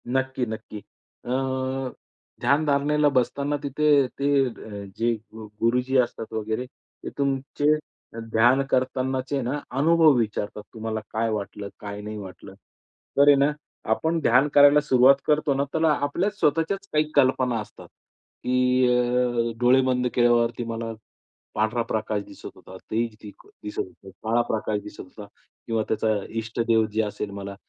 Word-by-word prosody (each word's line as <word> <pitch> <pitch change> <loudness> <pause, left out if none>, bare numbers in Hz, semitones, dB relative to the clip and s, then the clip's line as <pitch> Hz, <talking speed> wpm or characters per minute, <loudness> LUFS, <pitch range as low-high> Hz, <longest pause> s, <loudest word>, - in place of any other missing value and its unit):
नक्की, 130 0 -1
नक्की. 110 -1 -7 0.5
अ, - - -7 1.1
ध्यानधारणेला 145 0 +2
बसताना 140 +3 0
तिथे 145 0 +3
ते 140 +1 +1 0.2
अ, 105 -4 -7
जे 115 +1 +1
गु 110 0 -12 0.2
गुरुजी 125 +3 +2
असतात 120 -3 -1
वगैरे 110 +3 -2
ते 130 - -13
तुमचे 140 +2 +1 0.5
ध्यान 120 +4 +4
करतानाचे 130 +1 -1
ना, 130 +4 -2 0.2
अनुभव 160 +2 +5
विचारतात 105 -2 -2
तुम्हाला 110 -1 -4
काय 115 +1 0
वाटलं, 105 -1 -4
काय 105 0 -7
नाही 105 +1 -6
वाटलं? 95 -3 -10 0.6
तर 140 +1 +6
आहे 145 - +8
ना, 140 +2 +3 0.4
आपण 160 +8 +1
ध्यान 125 +3 +4
करायला 145 +1 +7
सुरुवात 135 -2 +5
करतो 150 -1 +2
ना, 135 +1 0
त्याला 160 -1 +2 0.2
आपल्या 175 +8 0
स्वतःच्याच 165 +6 0
काही 150 0 +4
कल्पना 130 -2 +3
असतात 105 - -10 0.6
की 125 0 +2
अ, 125 -1 +1
डोळे 125 +2 +5
बंद 125 -1 +1
केल्यावरती 120 -1 +2
मला 115 0 -4 0.6
पांढरा 110 +2 +1
प्रकाश 110 -2 -2
दिसत - - -10
होता. 95 - -13 0.2
तेज 115 0 -1
दि 105 - -9 0.3
दिसत 105 - -6
होतं. 95 +1 -6
काळा 115 +2 +2
प्रकाश 110 -1 -1
दिसत - - -12
होता 100 +3 -11 0.4
किंवा 115 -1 0
त्याचा 110 0 0 0.3
इष्टदेवजी 110 -1 0
असेल 105 -1 -4
मला, 100 0 -7
125 Hz, 140 wpm, -24 LUFS, 110-140 Hz, 1.1 s, आहे